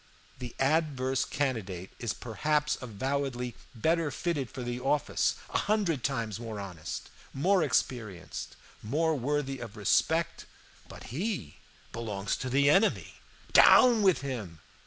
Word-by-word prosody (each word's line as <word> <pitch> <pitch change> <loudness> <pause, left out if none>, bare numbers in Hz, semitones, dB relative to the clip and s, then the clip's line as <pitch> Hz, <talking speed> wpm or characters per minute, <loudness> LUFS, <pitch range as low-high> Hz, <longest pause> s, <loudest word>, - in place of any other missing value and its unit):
The 125 -2 -7
adverse 135 -3 +1
candidate 100 -10 -3
is 115 - -1
perhaps 150 +6 0
avowedly 125 +1 -2 0.2
better 160 +6 +1
fitted 145 -6 -2
for 130 - -6
the 120 0 -3
office, 140 +3 +1 0.2
a - - +1
hundred 200 - 0
times 115 -7 -2
more 115 -3 -6
honest, 90 -6 -6 0.2
more 185 +7 +3
experienced, 115 - -2 0.3
more 155 +9 +1
worthy 135 0 -1
of 115 -2 -8
respect. 155 - +1 0.4
But - - -10
he 175 - -3 0.3
belongs 105 -4 -3
to 130 - -4
the 140 +2 +3
enemy. 190 +9 +3 0.4
Down 240 -3 +8
with 185 -10 +4
him! 110 - -5
130 Hz, 125 wpm, -30 LUFS, 115-150 Hz, 0.4 s, Down